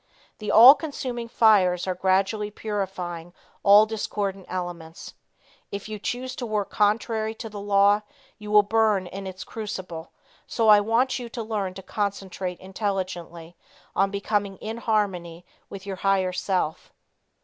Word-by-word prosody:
The 210 - -5
all 240 +5 +10
consuming 255 -6 -5
fires 200 -6 +4
are 185 - -1
gradually 190 +3 +1
purifying 185 -5 -5 0.3
all 205 +2 +7
discordant 205 -3 -4
elements. 175 -3 -6 0.6
If 200 0 -5
you 215 -1 -6
choose 255 +4 -4
to 245 - -4
work 210 -2 -2
contrary 220 +1 0
to 225 0 -7
the 205 -1 -8
law 200 +1 +3 0.4
you 210 0 -9
will 210 0 +6
burn 215 -2 +2
in 195 +2 -7
its 185 0 -7
crucible, 185 -6 -7 0.4
so 225 -2 +1
I 210 -1 +9
want 235 +5 +1
you 240 -1 -7
to 230 0 -5
learn 205 -4 -3
to 195 - -9
concentrate 195 -3 -4
intelligently 185 -4 -4 0.4
on 195 0 +3
becoming 200 -1 -2
in 220 +4 -6
harmony 185 -7 -1 0.2
with 195 -1 -9
your 195 -2 -5
higher 190 -1 +1
self. 180 -4 -2
200 Hz, 145 wpm, -25 LUFS, 185-215 Hz, 0.6 s, all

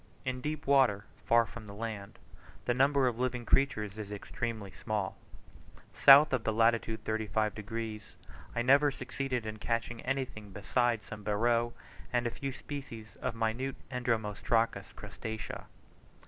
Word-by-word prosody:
In 130 -1 -2
deep 150 +1 -3
water, 130 -8 +4 0.2
far 115 0 +5
from 115 -1 -10
the 100 - -9
land, 110 -2 -5 0.5
the 120 - +2
number 135 +1 +4
of 120 -1 -1
living 125 -1 -1
creatures 110 -7 +1
is 105 -1 -6
extremely 105 0 -4
small: 100 +1 -3 0.8
south 140 +1 +8
of 125 -3 +1
the 110 - +1
latitude 115 0 +2
35 110 -1 0
degs., 110 0 -6 0.4
I 120 - +1
never 140 +3 +6
succeeded 135 -3 -3
in 110 0 -4
catching 115 +1 -2
anything 130 -6 -3
besides 115 +3 +1
some 105 - -8
beroe, 115 +3 +2 0.4
and 120 -1 +1
a 120 - 0
few 135 +2 -4
species 130 -6 -8
of - - -2
minute 115 +4 -1 0.2
entomostracous 115 -2 0
crustacea. 110 0 -6
115 Hz, 140 wpm, -32 LUFS, 110-130 Hz, 0.8 s, south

